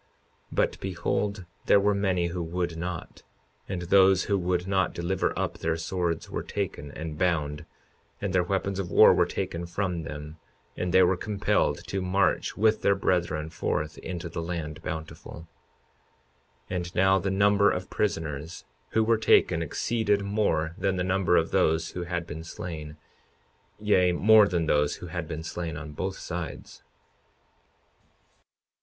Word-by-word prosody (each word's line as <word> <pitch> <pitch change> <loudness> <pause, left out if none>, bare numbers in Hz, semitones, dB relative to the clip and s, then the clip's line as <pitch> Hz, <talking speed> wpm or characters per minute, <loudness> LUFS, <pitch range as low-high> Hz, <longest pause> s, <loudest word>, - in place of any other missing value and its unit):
52:39 - - -38 0.5
But - - +1
behold, 95 +1 -2 0.2
there 100 - +6
were 105 +1 +2
many 95 -3 +1
that 85 +1 -4
would 85 0 -2
not; 85 +1 -6 0.5
and 90 -2 -3
those 95 +1 +5
who 100 - 0
would 90 -1 0
not 95 -1 +1
deliver 85 +2 0
up - - -2
their 80 0 -1
swords 85 0 -2
were - - -4
taken 95 -8 -4
and 80 -1 -6
bound, 75 -5 0 0.5
and 100 -2 -3
their 95 - +4
weapons 95 +2 -1
of 90 -3 -3
war - - +7
were - - +3
taken 85 +1 -4
from 90 -1 -2
them, 75 +1 -8 0.4
and 90 - -2
they 95 +1 +6
were 90 +1 +3
compelled 100 +2 0
to 95 - -3
march 95 0 +1
with 110 +1 +3
their 100 - +3
brethren 85 -5 0
forth 75 0 -2
into 85 -2 -5
the 85 0 -5
land 80 -3 -5
Bountiful. 80 0 -7 1.2
52:40 - - -1
And 90 -1 -4
now 95 +1 +4
the 95 - -2
number 100 +1 +4
of 90 0 -3
prisoners 80 -5 -3 0.3
who 110 - +3
were 115 0 +2
taken 85 -6 +4
exceeded 105 +5 0
more 100 -6 0
than 95 0 +1
the 90 - -1
number 90 -1 +2
of 80 - +1
those 80 -3 +2
who 90 -1 -5
had 85 -1 -3
been 80 0 -7
slain, 80 -2 -7 0.8
yea, 95 -4 +3
more 105 +3 +6
than 85 -4 0
those 75 -1 +2
who - - -9
had 85 -1 -5
been 80 +1 -5
slain 80 -2 -4
on 80 0 -7
both 95 +6 -4
sides. 85 -1 -6
90 Hz, 160 wpm, -27 LUFS, 80-95 Hz, 1.2 s, war